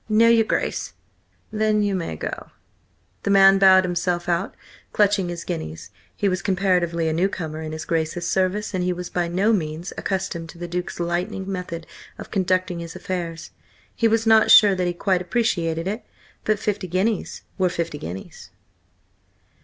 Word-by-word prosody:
"No, 220 +2 +5
your 230 -1 +5
Grace." - - -2 0.6
"Then 215 -1 +1
you 205 -1 0
may 170 - -3
go." - - -6 0.7
The - - -3
man 195 0 +6
bowed 190 -1 +7
himself 175 -1 -1
out, 175 +3 -1 0.4
clutching 200 -3 +2
his 170 -1 -5
guineas. 80 - -6 0.2
He 205 - 0
was 185 -1 0
comparatively 180 -4 +1
a 160 - 0
newcomer 160 -3 -2
in 155 -1 -5
his 155 0 -6
Grace's 165 +1 -1
service, 190 +4 0
and 185 -1 -1
he 180 0 0
was 180 0 -7
by 175 -1 0
no 190 +6 +2
means 160 -2 -3
accustomed 175 -4 -3
to 170 - -12
the 175 0 -6
Duke's 175 +1 -4
lightning 175 +3 -2
method 180 -3 -5 0.3
of - - -10
conducting 185 -2 0
his 170 -1 -7
affairs. 170 -4 -5 0.4
He 230 - +3
was 225 0 +1
not 220 -1 +5
sure 205 -2 +8
that 180 -1 -1
he 175 - -1
quite 185 +1 0
appreciated 175 -5 -1
it. 215 +5 -3 0.4
But 215 -1 +2
fifty 205 -2 -2
guineas 190 +5 -1 0.2
were 185 -1 +3
fifty 170 -4 -3
guineas. 90 +4 -8
180 Hz, 170 wpm, -23 LUFS, 170-200 Hz, 0.7 s, sure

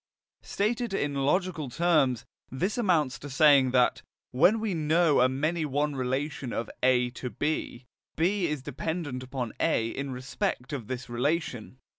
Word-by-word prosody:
Stated 225 +1 -1
in 145 -5 -1
logical 155 +2 0
terms, 145 -5 +2 0.2
this 180 +11 -2
amounts 170 - +1
to 145 - -8
saying 140 -1 +5
that, 125 -1 +2 0.3
when 180 - +4
we 215 -3 -1
know 160 -2 +3
a 130 - +5
many 155 +5 -1
one 145 0 -1
relation 130 0 -2
of 115 - -3
A 125 -1 +3
to 125 +1 -6
B, 145 -3 -3 0.3
B 180 +3 +1
is 150 -4 -3
dependent 160 -6 -4
upon 130 -3 -5
A 115 0 +1
in 140 +3 -4
respect 130 +2 -3
of 125 -7 -5
this 130 0 -5
relation. 125 -1 -2
145 Hz, 150 wpm, -28 LUFS, 130-165 Hz, 0.3 s, saying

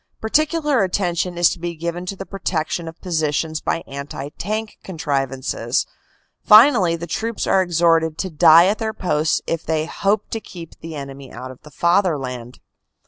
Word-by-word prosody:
Particular 300 +2 +1
attention 180 -2 -1
is 175 -1 +4
to - - -6
be 170 0 -4
given 170 +2 -4
to 195 - -3
the 195 - -7
protec 180 -5 -2
tion 170 -1 -3
of 165 +1 -9
positions 160 -2 -1
by 165 - -2
anti 140 0 -7
tank 215 +7 -5
contrivances. 135 -7 -2 0.6
Finally 215 -6 +6
the 170 +1 -6
troops 220 +7 -3
are 190 - +3
exhorted 165 -2 +2
to 190 - -3
die 160 +2 +7
at 205 +3 +1
their 220 -1 -2
posts 155 -5 0
if 165 -1 -2
they 155 -1 -1
hope 200 +5 -1
to 225 - -2
keep 170 -6 -11
the 165 -1 -8
enemy 140 -2 -8
out 130 0 -8
of 130 - -15
the 150 - -14
Fatherland. 145 -8 0
170 Hz, 170 wpm, -20 LUFS, 155-195 Hz, 0.6 s, die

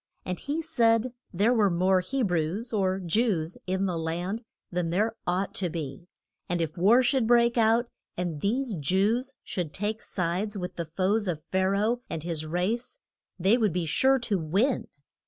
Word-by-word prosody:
And 180 -1 -3
he 305 +3 -3
said 235 -6 +2 0.2
there 205 +7 +3
were 210 -4 +4
more 185 +2 +3
He 265 +8 -2
brews, 180 +5 -1
or 190 -2 +1
Jews, 180 -3 0
in 190 +1 0
the 175 -3 -1
land 175 +7 -2 0.3
than 175 -2 -1
there 215 +6 +1
ought 185 +2 0
to 180 -2 0
be, 155 0 -6 0.4
and 175 0 0
if 160 -2 -2
war 215 +9 +5
should 245 -2 +2
break 235 0 +4
out, 230 +1 +4 0.3
and 170 -4 -3
these 240 +4 0
Jews 210 - +1
should 170 -5 -3
take 210 +2 -2
sides 185 +4 -2
with 180 -1 -5
the 170 - -3
foes 190 +6 0
of 160 -4 -2
Pha 190 0 +2
ra 200 +1 +1
oh 240 +2 0
and 165 -2 -4
his 160 -2 -3
race, 185 +9 -1 0.4
they 195 +7 +3
would 215 -7 +2
be 175 -1 -1
sure 265 - +3
to 220 -6 0
win. 195 - +1
190 Hz, 180 wpm, -27 LUFS, 175-230 Hz, 0.4 s, war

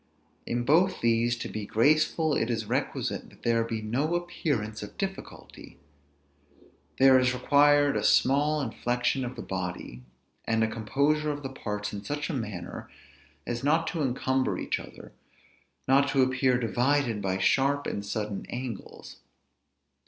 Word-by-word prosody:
In 120 0 -1
both 175 +8 +3
these, 115 +1 +2
to - - -5
be 105 -1 -6
graceful, 155 +5 +2
it 115 - 0
is 115 - -1
requisite - - -2
that - - -21
there 115 -1 +2
be 115 -1 -4
no 140 +10 0
appearance 145 -11 -2
of 105 - -9
difficulty; 195 -1 -7 1.2
there 130 -1 +7
is 125 0 +1
required 145 +2 +4
a - - -1
small 145 +3 +3
inflection 120 +1 -1
of 125 +1 -5
the - - -7
body; 90 -9 -5 0.4
and 115 0 +1
a - - +2
composure 140 +8 0
of 145 -1 -4
the 135 - -4
parts 105 -5 -4
in 100 0 -6
such 145 +5 -3
a - - -4
manner, 105 -9 -5 0.6
as 120 +1 -4
not 160 +3 +2
to 165 - -3
incumber 130 0 0
each - - -2
other, - - -12 0.8
not 140 +1 +4
to 135 -1 +3
appear 130 0 +2
divided 120 0 +1
by 95 -1 -1
sharp 140 +8 +2
and 100 - -3
sudden 105 -1 -4
angles. 120 -4 -7
125 Hz, 150 wpm, -28 LUFS, 110-145 Hz, 1.2 s, there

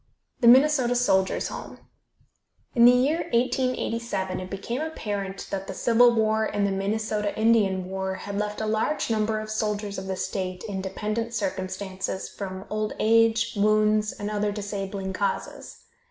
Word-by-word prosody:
THE 235 - +3
MINNESOTA 260 -1 +6
SOLDIERS' 195 -6 +2
HOME. - - -8 1.0
In 235 -1 +6
the 245 - +10
year 270 +6 +2
1887 235 -5 0
it 185 0 -7
became 230 +7 -4
apparent 205 -11 -4
that 195 -1 -3
the 190 - -6
Civil 240 +2 +4
War 220 0 +2
and 205 -1 0
the 200 - 0
Minnesota 210 +1 -1
Indian 205 -5 +3
War 190 0 -3
had 200 +2 -6
left 210 +1 -3
a - - -1
large 220 +5 0
number 215 0 +1
of 215 0 -6
soldiers 210 -2 -2
of 190 - -7
the 190 - -2
state 185 -1 -4
in 195 -2 -3
dependent 215 +4 -3
circumstances 190 -1 -3
from 190 -1 -7
old 215 0 -1
age, 225 +1 +3
wounds 215 +1 +3
and 205 +1 -5
other 210 0 0
disabling 200 -2 -4
causes. 195 0 -4
210 Hz, 155 wpm, -25 LUFS, 195-230 Hz, 1.0 s, the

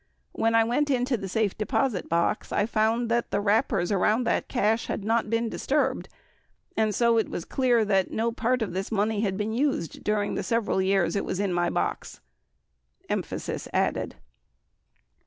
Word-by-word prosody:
When 225 0 +1
I 225 - +6
went 250 +6 0
into 250 -1 +1
the 195 -4 -5
safe 210 0 0
deposit 215 -1 -1
box, 170 +5 0
I 205 - +2
found 225 +1 +1
that 235 0 +1
the - - 0
wrappers 205 -3 +1
around 210 +5 +2
that 235 - 0
cash 225 -2 +1
had - - -3
not 225 0 +1
been 230 +1 0
disturbed, 270 +2 -1 0.7
and 215 -2 +1
so 235 0 +3
it 220 - -1
was 170 - -5
dear 245 -4 +2
that 195 -2 +2
no 230 +1 -1
part 245 +1 0
of 205 - -5
this 190 +3 -3
money 210 0 +1
had 195 -3 -1
been 215 +1 -2
used 250 - -1
during 210 -1 0
the - - -2
several 230 -5 0
years 190 0 +1
it 200 - 0
was 185 - -3
in 200 -3 0
my 175 0 +1
box. - - -3 0.8
66 - - -31
[Emphasis - - -3
added. - - 0
220 Hz, 180 wpm, -26 LUFS, 200-235 Hz, 0.8 s, I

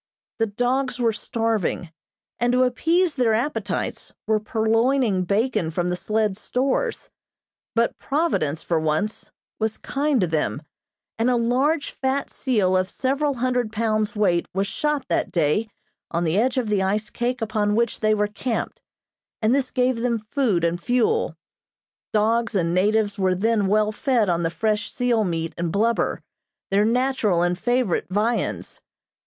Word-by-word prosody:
The 225 - +2
dogs 245 +4 -1
were 235 -3 +1
starving, 220 -7 -2 0.5
and, 240 +1 +2
to 255 +1 +4
appease 330 +7 +2
their 240 -5 +2
appetites, 225 -6 -2
were 215 0 +2
purloining 225 -1 +1
bacon 215 -2 0
from 175 +2 -1
the - - 0
sled's 210 +1 -1
stores; 275 - -1 0.6
but 230 0 +1
Providence, 270 - 0
for 165 -2 0
once, 160 +7 -1 0.3
was 220 0 -1
kind 285 -1 0
to - - +3
them, 160 -2 -1 0.6
and 230 +2 +3
a 250 - +3
large, 265 +6 +1
fat 270 +1 -2
seal 205 -8 +1
of 185 0 +1
several 280 +2 0
hundred 250 -2 0
pounds 215 -1 0
weight 180 -5 +2
was 195 +1 +1
shot 290 +7 -1
that - - 0
day 170 +7 +1 0.4
on 170 +1 -1
the 165 0 0
edge 250 +5 +2
of 240 -4 0
the 205 -2 +2
ice 205 +3 -1
cake 245 +1 -2
upon 215 -2 0
which 235 0 0
they 215 0 +2
were 210 0 +1
camped, 220 +3 -3 0.6
and 220 +2 +2
this 270 -1 +1
gave 255 -1 +1
them 235 0 0
food 215 -4 0
and 170 +1 0
fuel. 250 - +1 0.8
Dogs 225 +2 +1
and 170 -3 +1
natives 205 +2 +1
were 185 -1 +2
then 210 +1 +1
well 210 +1 +2
fed 235 -3 +1
on 170 -1 +1
the 165 - 0
fresh 215 +4 -1
seal 245 -3 +1
meat 165 -3 -2
and 170 -1 -1
blubber, 225 +5 0 0.5
their 200 +2 +3
natural 235 -7 +1
and 175 0 +1
favorite 245 0 0
viands. 215 +5 -1
220 Hz, 155 wpm, -23 LUFS, 195-250 Hz, 0.8 s, to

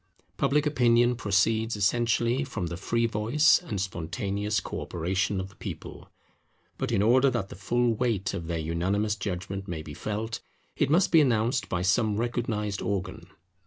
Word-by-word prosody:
Public 150 +1 +2
Opinion 120 -4 +3
proceeds 110 +1 +1
essentially 120 +4 +1
from 115 -9 -4
the 85 0 -4
free 115 +6 0
voice 115 +7 +3
and 110 - -4
spontaneous 100 +4 -2
co - - -5
operation 95 +3 -1
of 95 0 -5
the 100 - -20
people. - - -8 0.7
But - - -2
in 95 - +2
order 130 +5 +5
that 115 -6 -2
the - - -9
full 120 +5 +1
weight 110 -5 -1
of 85 - -5
their 85 -1 -2
unanimous 95 +7 0
judgment 95 -1 -4
may 80 -4 -4
be 75 - -9
felt, 110 +7 -4 0.4
it - - +1
must 170 +5 +3
be 165 - +7
announced 120 -1 +1
by 90 0 -1
some 105 +2 +2
recognized 110 -3 -2
organ. 95 -3 -3
105 Hz, 160 wpm, -27 LUFS, 95-120 Hz, 0.7 s, be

